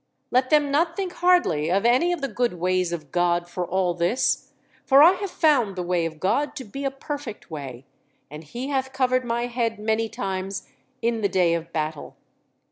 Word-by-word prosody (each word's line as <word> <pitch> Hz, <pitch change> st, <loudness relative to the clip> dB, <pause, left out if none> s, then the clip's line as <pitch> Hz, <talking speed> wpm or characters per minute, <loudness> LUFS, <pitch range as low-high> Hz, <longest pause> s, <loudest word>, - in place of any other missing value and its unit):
Let 255 Hz, +1 st, +2 dB
them 295 Hz, -2 st, +3 dB
not 330 Hz, +4 st, +1 dB
think 375 Hz, -2 st, -3 dB
hardly 350 Hz, -, +2 dB
of 195 Hz, +5 st, +1 dB
any 255 Hz, +9 st, +4 dB
of 350 Hz, -4 st, -2 dB
the 275 Hz, -, -1 dB
good 245 Hz, -1 st, -1 dB
ways 180 Hz, 0 st, 0 dB
of 155 Hz, -5 st, -6 dB
God 175 Hz, -1 st, +1 dB
for 175 Hz, +1 st, -4 dB
all 185 Hz, 0 st, +1 dB
this, 175 Hz, +8 st, 0 dB, 0.3 s
for 275 Hz, +1 st, +6 dB
I 335 Hz, -, +9 dB
have 390 Hz, +1 st, -4 dB
found 265 Hz, -, +2 dB
the 180 Hz, -, -3 dB
way 175 Hz, -1 st, 0 dB
of 160 Hz, -1 st, -10 dB
God 280 Hz, -, 0 dB
to 270 Hz, -, -6 dB
be 275 Hz, +7 st, -7 dB
a -, -, +2 dB
perfect 270 Hz, -, -7 dB
way, 135 Hz, -4 st, -7 dB, 0.4 s
and 150 Hz, +2 st, -10 dB
He 240 Hz, -, -6 dB
hath 265 Hz, -1 st, -1 dB
covered 255 Hz, -1 st, +1 dB
my 235 Hz, 0 st, -1 dB
head 235 Hz, -2 st, -2 dB
many 220 Hz, +1 st, 0 dB
times 190 Hz, -1 st, -4 dB, 0.4 s
in 230 Hz, -1 st, 0 dB
the 200 Hz, -, +1 dB
day 180 Hz, -2 st, +2 dB
of 170 Hz, 0 st, -3 dB
battle. 155 Hz, -2 st, -4 dB
220 Hz, 200 wpm, -24 LUFS, 175-270 Hz, 0.4 s, I